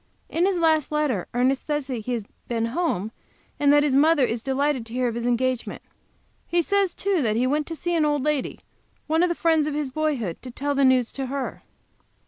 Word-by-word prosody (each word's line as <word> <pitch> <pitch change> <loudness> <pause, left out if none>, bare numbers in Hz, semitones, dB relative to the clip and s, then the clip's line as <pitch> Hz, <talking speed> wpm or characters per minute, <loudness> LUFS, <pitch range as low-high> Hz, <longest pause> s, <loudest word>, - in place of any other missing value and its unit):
In 345 +3 +1
his 390 -2 +1
last 315 -4 +2
letter 295 - 0
Ernest 255 +2 0
says 295 -2 -1
he 255 -4 -4
has 225 -4 -3 0.2
been 230 -1 -1
home, 220 - -1 0.5
and 285 -1 +4
that 290 0 +5
his 285 -3 +1
mother 300 0 +4
is 230 -1 -2
delighted 270 0 0
to 225 - -10
hear 255 0 +1
of 235 - -2
his 235 +1 -3
engagement. 250 0 -1 0.6
He 345 0 +2
says, 400 0 +1
too, 390 -4 0
that 215 -4 +1
he 240 +3 +2
went 295 +3 0
to 330 - -5
see 345 +2 -2
an 325 -2 +2
old 295 -2 +1
lady, 300 -2 -1 0.4
one 320 +2 +1
of 360 - +3
the 345 - -1
friends 320 -3 +2
of 300 - -2
his 295 -3 -2
boyhood, 265 - -2
to 255 - -8
tell 285 +4 -2
the 280 0 +2
news 255 -3 +3
to 270 -1 -4
her. 270 0 -4
280 Hz, 220 wpm, -24 LUFS, 250-310 Hz, 0.6 s, that